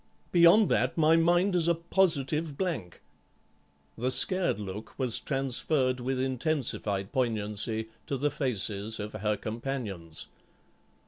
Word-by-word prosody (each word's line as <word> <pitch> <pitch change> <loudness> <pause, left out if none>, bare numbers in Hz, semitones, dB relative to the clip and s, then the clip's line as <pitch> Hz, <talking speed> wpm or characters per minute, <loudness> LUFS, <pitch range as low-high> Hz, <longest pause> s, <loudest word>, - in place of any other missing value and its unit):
Beyond 175 +5 +6
that - - +1
my 160 0 +5
mind 175 +4 +3
is 170 -2 +2
a 170 - +3
positive 160 -4 0
blank." 145 - -4 0.9
The 125 +3 -1
scared 185 - +2
look 105 +2 -8
was 125 -4 +2
transferred 135 -1 0
with 130 +1 -2
intensified 130 -7 -1
poignancy 110 -3 0 0.2
to 140 - -2
the 145 +3 0
faces 110 -5 -1
of 105 +1 -6
her 105 0 -1
companions. 110 -9 -4
130 Hz, 120 wpm, -28 LUFS, 110-160 Hz, 0.9 s, Beyond